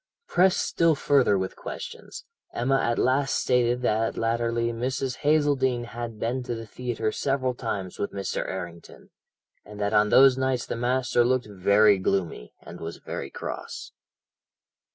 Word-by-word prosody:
"Pressed 185 +1 +3
still 165 -2 +2
further 135 -7 +3
with 95 0 -3
questions, 485 +1 -8 0.3
Emma 135 +3 +1
at 120 0 0
last 135 +2 +2
stated 125 0 +1
that 115 -1 0
latterly 115 0 0
Mrs. 130 +2 -2
Hazeldene 145 -5 +2
had 120 -1 -6
been 120 +4 -1
to 120 -1 -4
the 115 0 -7
theatre 115 -1 -3
several 130 -1 -1
times 95 -6 -5
with 100 - -2
Mr. 100 -1 -3
Errington, 85 -3 -8 0.5
and 105 0 -11
that 100 +1 -1
on 105 0 +4
those 130 +1 +6
nights 130 -2 0
the - - -4
master 120 0 +1
looked 125 +1 +1
very 100 0 +4
gloomy, 90 -10 -2
and 85 - -11
was 85 0 -6
very 70 - -6
cross. - - -7
120 Hz, 150 wpm, -26 LUFS, 105-130 Hz, 0.5 s, those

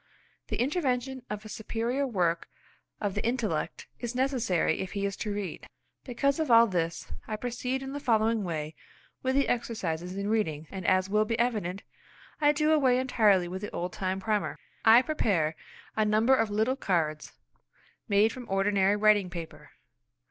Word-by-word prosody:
The - - -3
intervention 265 -2 -1
of 210 0 -5
a - - -6
superior 235 +5 -2
work 175 -7 0 0.5
of 205 -2 -2
the - - -3
intellect 220 -11 -2
is 240 0 -4
necessary 245 - +1
if 190 - -4
he 200 -1 -1
is 200 0 -2
to 210 - -3
read. 200 -5 -5 0.4
Because 280 +4 0
of 315 -3 -1
all 230 0 +8
this, 170 -5 -2
I 215 - -2
proceed 250 +3 -3
in 270 0 -6
the 285 - -4
following 225 -4 +2
way 155 -3 -4 0.5
with 260 0 0
the 280 - +3
exercises 185 -7 -2
in 200 0 -2
reading, 160 -9 0
and, 190 -2 -5
as 185 0 +3
will 210 +2 +2
be 225 +1 -1
evident, 210 -6 -1 0.6
I 295 -1 +5
do 305 +1 +1
away 265 -5 +4
entirely 215 -8 +3
with 185 +2 -5
the 210 - -4
old 180 +1 -4
time 190 0 -2
primer. 210 +1 -1 0.3
I 230 +3 +7
prepare 190 - 0 0.4
a 220 - +2
number 215 +4 +3
of 225 -4 +1
little 220 +5 +1
cards 165 - -1 0.7
made 210 +1 +3
from 250 -2 -9
ordinary 195 0 +2
writing 210 -2 +4
paper. 170 -2 -8
215 Hz, 170 wpm, -28 LUFS, 190-245 Hz, 0.7 s, all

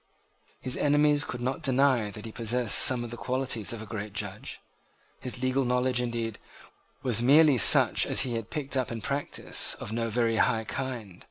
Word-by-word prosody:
His 130 -1 -4
enemies 145 0 +1
could 125 - -7
not 130 +5 -4
deny 130 -5 0
that 105 +1 -10
he 110 - -8
possessed 115 0 -1
some 125 -2 +7
of 120 - -9
the 120 - -8
qualities 130 -4 -2
of 115 -2 -7
a - - -10
great 105 -2 -8
judge. 105 -1 -6 0.6
His 125 0 -6
legal 130 +1 0
knowledge, 125 0 -1
indeed, 115 -3 -5 0.6
was 120 -3 +1
merely 145 +1 +4
such - - +6
as - - +1
he 125 - -3
had 115 -1 -6
picked 140 -2 -3
up 130 -2 -2
in 115 -1 -7
practice 140 +4 -1
of - - -9
no 115 0 -3
very 115 0 -1
high 115 -2 0
kind. 115 -6 -7
120 Hz, 185 wpm, -26 LUFS, 115-130 Hz, 0.6 s, some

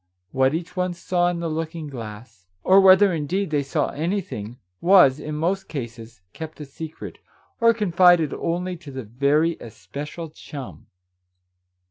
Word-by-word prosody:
What 130 +2 +2
each 175 +2 -5
one 180 -1 -1
saw 175 0 0
in 175 -1 -3
the 170 - -2
looking 160 0 -4
glass, 115 -6 -9 0.2
or 190 +1 +6
whether, 190 0 +6
indeed, 170 +4 -2
they 145 -2 +2
saw 140 +2 -1
anything, 150 - -4 0.2
was, 175 -7 +6
in 150 0 -5
most 175 +6 -1
cases, 115 - -7
kept 160 -1 -8
a 150 - -6
secret, 160 +3 -9 0.4
or 230 -1 +6
confided 175 -7 +4
only 180 +2 -2
to 160 -3 -12
the 130 -1 -6
very 140 +9 +1
especial 150 +7 -8
chum 135 - -10
155 Hz, 145 wpm, -23 LUFS, 135-175 Hz, 0.4 s, or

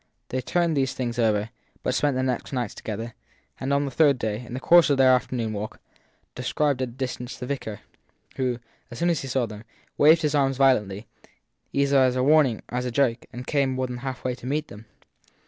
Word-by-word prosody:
They 130 - -2
turned 170 +4 +1
these 135 -2 0
things 120 -2 -3
over, 110 -1 +1 0.3
but - - 0
spent 145 -3 +1
the 130 - 0
next 130 -2 -2
nights 125 -2 -2
together; 115 +2 -6 0.5
and 135 - -2
on 140 0 +2
the 140 - -4
third 145 -1 +4
day, 110 0 -3
in 120 +1 -8
the - - -3
course 170 +4 +6
of 140 - +3
their 130 -1 +6
afternoon 120 -3 -1
walk, 105 +1 -5 0.5
descried 135 +2 0
at 130 - 0
a - - -12
distance 125 0 -5
the 125 - -6
vicar, 125 -6 -5 0.5
who, 125 -2 -1 0.3
as 120 - -9
soon 175 +6 +2
as 165 - -1
he 135 - -6
saw 130 -1 0
them, 105 -1 -9 0.4
waved 160 +3 +6
his 150 -1 +1
arms 135 -2 +2
violently 110 -6 +2 0.7
either 140 0 +3
as 130 -1 +3
a 130 - +1
warning 140 -5 +4
or 125 - -1
as 125 - -4
a - - -1
joke 120 -2 +1
and 125 +1 -7
came 140 -3 +1
more 130 0 -1
than 125 -1 -5
halfway 130 0 -4
to 125 0 -9
meet 150 +3 -2
them. 105 +2 -12
130 Hz, 215 wpm, -25 LUFS, 120-140 Hz, 0.7 s, course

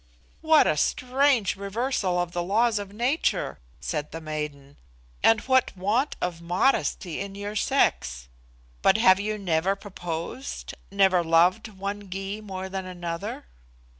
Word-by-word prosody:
"What 315 -1 +5
a 150 - +2
strange 255 - +2
reversal 200 -1 -1
of 175 -1 -1
the 175 0 -2
laws 215 +5 +2
of 200 -1 -7
nature!" 245 +9 0 0.2
said 150 - -3
the 165 - -5
maiden, 150 -3 -6 0.4
"and 225 -1 +5
what 260 -6 +2
want 220 +10 +1
of 175 -2 -3
modesty 175 - 0
in 195 0 -5
your 205 +1 -5
sex! 60 - +1 0.5
But 195 - +5
have 190 -4 +6
you 215 +1 -2
never 185 0 +1
proposed, 180 +4 -6 0.2
never 190 -3 +3
loved 170 +6 +3
one 200 0 -6
Gy 195 +3 -4
more 190 -2 -6
than 190 -1 -5
another?" 175 - -5
195 Hz, 135 wpm, -26 LUFS, 175-215 Hz, 0.5 s, have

